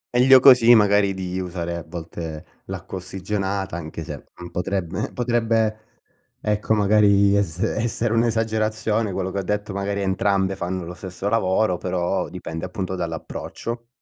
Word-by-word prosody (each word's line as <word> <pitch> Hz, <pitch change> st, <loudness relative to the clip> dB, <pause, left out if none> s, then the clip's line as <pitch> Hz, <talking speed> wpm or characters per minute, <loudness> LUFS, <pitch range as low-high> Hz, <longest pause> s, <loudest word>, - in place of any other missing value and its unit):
Meglio 130 Hz, +2 st, +7 dB
così 125 Hz, -3 st, +8 dB
magari 100 Hz, -2 st, +4 dB
di 95 Hz, -1 st, -4 dB
usare 85 Hz, -2 st, -4 dB
a 85 Hz, -, -5 dB
volte 80 Hz, -2 st, -7 dB, 0.2 s
l'acqua 95 Hz, -, -6 dB
ossigenata, 95 Hz, 0 st, -3 dB
anche 80 Hz, 0 st, -6 dB
se, 75 Hz, -2 st, -8 dB
mhmm, 85 Hz, 0 st, -9 dB
potrebbe 95 Hz, +1 st, -2 dB
potrebbe, 115 Hz, -3 st, +1 dB, 0.6 s
ecco 105 Hz, +1 st, 0 dB
magari 100 Hz, -1 st, +4 dB
es 90 Hz, -5 st, 0 dB
essere 115 Hz, +3 st, 0 dB
un'esagerazione, 110 Hz, -2 st, 0 dB
quello 95 Hz, 0 st, -2 dB
che 100 Hz, -, -2 dB
ho -, -, 0 dB
detto, 105 Hz, +1 st, -2 dB
magari 100 Hz, 0 st, -2 dB
entrambe 95 Hz, 0 st, +1 dB
fanno 90 Hz, 0 st, -3 dB
lo 90 Hz, -, -7 dB
stesso 95 Hz, +1 st, -6 dB
lavoro, 95 Hz, -3 st, +2 dB
però 90 Hz, -1 st, -1 dB
dipende 80 Hz, 0 st, -6 dB
appunto 95 Hz, +1 st, -4 dB
dall'approccio. 95 Hz, +7 st, -5 dB
100 Hz, 140 wpm, -23 LUFS, 90-110 Hz, 0.6 s, così